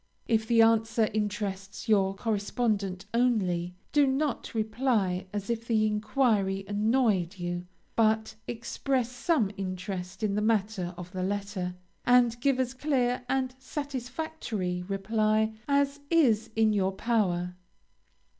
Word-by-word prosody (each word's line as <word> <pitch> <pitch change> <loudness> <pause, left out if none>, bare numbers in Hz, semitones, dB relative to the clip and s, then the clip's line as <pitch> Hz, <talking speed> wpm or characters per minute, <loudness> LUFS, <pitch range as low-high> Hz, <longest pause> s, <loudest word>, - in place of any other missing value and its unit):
If 220 -1 +1
the 230 -1 +6
answer 225 0 +3
interests 205 -2 -3
your 195 -3 +3
correspondent 205 -3 -1
only, 185 -8 +1 0.2
do 290 -2 +4
not 270 -2 -1
reply 215 -5 0
as 205 -1 -4
if 230 0 -2
the 220 -2 +3
enquiry 210 -3 +1
annoyed 205 -4 +1
you, 175 0 -4 0.3
but 220 -1 +2
express 245 +1 -1
some 245 - +1
interest 185 0 -5
in 205 -2 +1
the 210 - 0
matter 210 -4 0
of 180 0 -8
the 185 -1 -4
letter, 195 -2 -2 0.3
and 240 -1 +4
give 275 -1 +2
as 255 -1 0
clear 255 -3 0
and 260 -1 0
satisfactory 260 - -4
reply 215 +2 +1
as 280 0 +2
is 250 -10 +3
in 220 -1 +4
your 195 -2 +1
power. 185 -5 0
220 Hz, 125 wpm, -29 LUFS, 195-245 Hz, 0.3 s, the